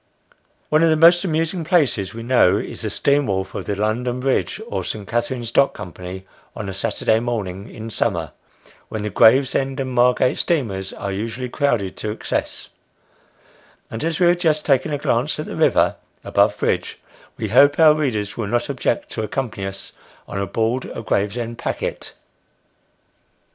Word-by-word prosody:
One 155 Hz, +1 st, +3 dB
of 165 Hz, -, +5 dB
the 160 Hz, -, +4 dB
most 170 Hz, +3 st, +6 dB
amusing 165 Hz, 0 st, -1 dB
places 145 Hz, -, +1 dB
we 115 Hz, 0 st, -8 dB
know, 115 Hz, -6 st, +4 dB
is -, -, -5 dB
the 110 Hz, -, -2 dB
steam 140 Hz, +6 st, +1 dB
wharf 95 Hz, -1 st, -2 dB
of -, -, -5 dB
the 100 Hz, -, -2 dB
London 120 Hz, +4 st, -1 dB
Bridge, 135 Hz, +9 st, 0 dB
or 235 Hz, -, -3 dB
St. 105 Hz, -3 st, -5 dB
Katharine's 120 Hz, 0 st, -2 dB
Dock 140 Hz, +3 st, +3 dB
Company, 95 Hz, -1 st, -8 dB, 0.3 s
on 105 Hz, -3 st, -5 dB
a 95 Hz, -, -4 dB
Saturday 110 Hz, +2 st, 0 dB
morning 105 Hz, -5 st, -4 dB
in 110 Hz, +1 st, -8 dB
summer, 85 Hz, -10 st, -1 dB, 0.6 s
when 110 Hz, -1 st, -4 dB
the 105 Hz, -, -3 dB
Gravesend 135 Hz, +5 st, +3 dB
and 130 Hz, -1 st, -2 dB
Margate 125 Hz, +1 st, +3 dB
steamers 105 Hz, -, -1 dB
are 100 Hz, -, -5 dB
usually 115 Hz, +5 st, -4 dB
crowded 120 Hz, -9 st, 0 dB
to 110 Hz, -, -4 dB
excess; 105 Hz, -, -3 dB, 1.2 s
and 115 Hz, -, -5 dB
as 165 Hz, +1 st, -1 dB
we 180 Hz, -, +4 dB
have 175 Hz, 0 st, +4 dB
just 155 Hz, -3 st, +1 dB
taken 135 Hz, +1 st, +2 dB
a 145 Hz, -, 0 dB
glance -, -, 0 dB
at -, -, -3 dB
the -, -, -6 dB
river -, -, +3 dB, 0.3 s
above -, -, +2 dB
bridge, -, -, -1 dB, 0.4 s
we 110 Hz, -2 st, -3 dB
hope 140 Hz, +6 st, +5 dB
our 155 Hz, -2 st, +7 dB
readers 120 Hz, -10 st, -2 dB
will 115 Hz, -3 st, -3 dB
not 120 Hz, +4 st, -1 dB
object 130 Hz, -3 st, -1 dB
to 110 Hz, -, -3 dB
accompany 110 Hz, -3 st, -3 dB
us 95 Hz, 0 st, -7 dB, 0.4 s
on 100 Hz, -, -3 dB
board 115 Hz, +7 st, -1 dB
a -, -, -5 dB
Gravesend 115 Hz, +4 st, -2 dB
packet. -, -, -4 dB
120 Hz, 170 wpm, -21 LUFS, 105-140 Hz, 1.2 s, our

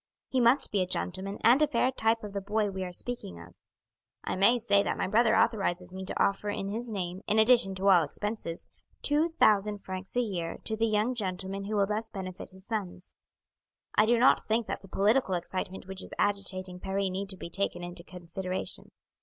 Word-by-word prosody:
He 260 Hz, -, +1 dB
must 250 Hz, +3 st, +4 dB
be 200 Hz, -, +1 dB
a 180 Hz, -, 0 dB
gentleman 190 Hz, +2 st, -3 dB
and 250 Hz, +5 st, +6 dB
a 305 Hz, -, +5 dB
fair 250 Hz, +1 st, +2 dB
type 225 Hz, -2 st, +1 dB
of 205 Hz, -1 st, -7 dB
the 200 Hz, -, -2 dB
boy 210 Hz, +1 st, 0 dB
we 190 Hz, -1 st, -4 dB
are 180 Hz, -, -5 dB
speaking 175 Hz, -, -6 dB
of. 85 Hz, +1 st, -13 dB, 0.7 s
I -, -, -2 dB
may 200 Hz, +6 st, +5 dB
say 210 Hz, -4 st, +3 dB
that -, -, -1 dB
my -, -, 0 dB
brother 225 Hz, +3 st, +4 dB
authorizes 180 Hz, -4 st, +1 dB
me 190 Hz, 0 st, -6 dB
to -, -, -4 dB
offer 200 Hz, +1 st, +1 dB
in 195 Hz, -1 st, -3 dB
his 230 Hz, +4 st, -4 dB
name, 185 Hz, -3 st, -4 dB
in 215 Hz, -, +2 dB
addition 220 Hz, -4 st, +5 dB
to 190 Hz, +1 st, -1 dB
all 180 Hz, -4 st, +7 dB
expenses, 190 Hz, +2 st, -4 dB, 0.4 s
two 315 Hz, +3 st, +2 dB
thousand 210 Hz, -1 st, +3 dB
francs 190 Hz, +4 st, -5 dB
a -, -, +4 dB
year 180 Hz, -8 st, -3 dB
to 220 Hz, -, -2 dB
the 225 Hz, +1 st, +1 dB
young 215 Hz, +3 st, +1 dB
gentleman 195 Hz, -2 st, -3 dB
who 215 Hz, +2 st, -2 dB
will 200 Hz, -1 st, +3 dB
thus 215 Hz, +2 st, -3 dB
benefit 185 Hz, -3 st, -7 dB
his 190 Hz, 0 st, -17 dB
sons. 195 Hz, -5 st, -5 dB, 0.8 s
I 215 Hz, -, +4 dB
do 240 Hz, +1 st, +4 dB
not 250 Hz, +3 st, +4 dB
think 225 Hz, +1 st, +1 dB
that -, -, -4 dB
the 195 Hz, -, -13 dB
political 200 Hz, +1 st, +2 dB
excitement 185 Hz, +2 st, -4 dB
which 190 Hz, 0 st, -6 dB
is -, -, -6 dB
agitating 190 Hz, -2 st, -1 dB
Paris 195 Hz, 0 st, -1 dB
need 195 Hz, +1 st, -4 dB
be 170 Hz, -, -8 dB
taken 175 Hz, -1 st, -1 dB
into 175 Hz, 0 st, -6 dB
consideration. 180 Hz, +1 st, -4 dB
200 Hz, 205 wpm, -29 LUFS, 185-220 Hz, 0.8 s, all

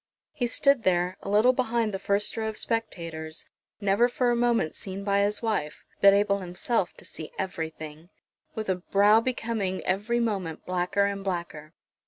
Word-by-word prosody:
He 245 Hz, -4 st, -1 dB
stood 275 Hz, +2 st, +3 dB
there, 180 Hz, -2 st, +1 dB
a -, -, -6 dB
little 215 Hz, +5 st, +5 dB
behind 235 Hz, -4 st, 0 dB
the 195 Hz, -, -2 dB
first 200 Hz, +1 st, 0 dB
row 220 Hz, -1 st, -2 dB
of 215 Hz, -, -5 dB
spectators, 165 Hz, -8 st, -4 dB, 0.3 s
never 205 Hz, +4 st, +3 dB
for 245 Hz, 0 st, +1 dB
a -, -, +2 dB
moment 235 Hz, -9 st, +1 dB
seen 195 Hz, 0 st, -6 dB
by 200 Hz, 0 st, +2 dB
his 205 Hz, +2 st, 0 dB
wife, 205 Hz, -10 st, -2 dB, 0.2 s
but 200 Hz, -, +9 dB
able 200 Hz, 0 st, +2 dB
himself 185 Hz, +2 st, -1 dB
to -, -, -12 dB
see 155 Hz, -, -9 dB
everything, 160 Hz, -2 st, -5 dB, 0.5 s
with 220 Hz, -1 st, -4 dB
a 185 Hz, -1 st, +1 dB
brow 205 Hz, +4 st, +4 dB
becoming 225 Hz, -6 st, -2 dB
every 210 Hz, +6 st, 0 dB
moment 195 Hz, -9 st, -2 dB
blacker 180 Hz, +2 st, +1 dB
and 200 Hz, -1 st, -3 dB
blacker. 170 Hz, -4 st, -5 dB
200 Hz, 170 wpm, -27 LUFS, 180-225 Hz, 0.5 s, but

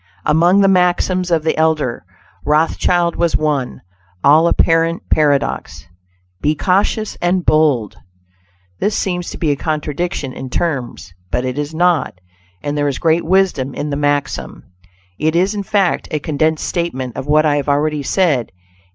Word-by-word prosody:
Among 175 Hz, +6 st, +4 dB
the 195 Hz, -, +4 dB
maxims 180 Hz, 0 st, +2 dB
of 165 Hz, -3 st, +1 dB
the 160 Hz, -, 0 dB
elder 155 Hz, -6 st, 0 dB, 0.4 s
Rothschild 165 Hz, +3 st, +1 dB
was 170 Hz, -1 st, +1 dB
one, 145 Hz, -5 st, -2 dB, 0.4 s
all 155 Hz, +4 st, +5 dB
apparent 165 Hz, 0 st, +1 dB
paradox: 145 Hz, -2 st, 0 dB, 0.6 s
"Be 150 Hz, +1 st, +1 dB
cautious 200 Hz, +5 st, 0 dB
and 175 Hz, 0 st, 0 dB
bold." 145 Hz, -9 st, +2 dB, 0.8 s
This 205 Hz, -, 0 dB
seems 180 Hz, -2 st, -2 dB
to -, -, -8 dB
be 155 Hz, -3 st, 0 dB
a -, -, +1 dB
contradiction 150 Hz, -1 st, -3 dB
in 130 Hz, -, -7 dB
terms, 130 Hz, -, -3 dB, 0.2 s
but 125 Hz, +1 st, -1 dB
it 130 Hz, +2 st, -3 dB
is 150 Hz, +2 st, -4 dB
not, 170 Hz, -, +1 dB, 0.4 s
and 145 Hz, 0 st, -2 dB
there 145 Hz, 0 st, 0 dB
is 140 Hz, -, -2 dB
great 165 Hz, 0 st, +1 dB
wisdom 170 Hz, -8 st, +1 dB
in 150 Hz, 0 st, -4 dB
the -, -, -1 dB
maxim. 145 Hz, 0 st, -2 dB, 0.6 s
It 155 Hz, +1 st, 0 dB
is, 185 Hz, +4 st, +2 dB
in 205 Hz, -, -3 dB
fact, 200 Hz, -2 st, 0 dB
a 155 Hz, -, -1 dB
condensed 155 Hz, +2 st, -1 dB
statement 130 Hz, -9 st, -3 dB
of 135 Hz, -, -6 dB
what 155 Hz, +1 st, +3 dB
I 145 Hz, -1 st, +2 dB
have 145 Hz, 0 st, -2 dB
already 150 Hz, +1 st, +1 dB
said. 145 Hz, -5 st, 0 dB
155 Hz, 155 wpm, -17 LUFS, 145-175 Hz, 0.8 s, all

